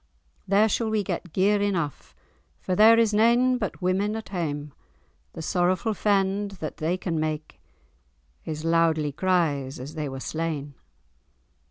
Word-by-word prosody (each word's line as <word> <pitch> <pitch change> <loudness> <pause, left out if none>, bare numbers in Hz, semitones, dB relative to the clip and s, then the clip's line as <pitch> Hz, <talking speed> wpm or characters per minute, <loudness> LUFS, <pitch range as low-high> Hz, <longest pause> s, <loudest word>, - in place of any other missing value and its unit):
There 200 +3 +4
we - - +1
shall 220 0 0
get 180 -2 -4
gear 200 +3 +2
enough, 175 -9 -2 0.4
For 185 - -2
there 220 +3 +7
is 225 -2 +3
nane 240 +4 +4
but 200 -4 -4
women 195 +4 +1
at 225 - -6
hame; 150 -6 -4 0.6
The - - -7
sorrowful 185 +6 +1
fend 200 0 +1
that 155 - -5
they 165 +4 -1
can 170 -3 -2
make. 155 0 -4 0.8
Is 155 0 -5
loudly 165 -2 +2
cries 150 -6 0
as 135 +4 -8
they 155 -3 -4
were 135 0 -6
slain." 155 -1 -4
180 Hz, 145 wpm, -25 LUFS, 155-205 Hz, 0.8 s, there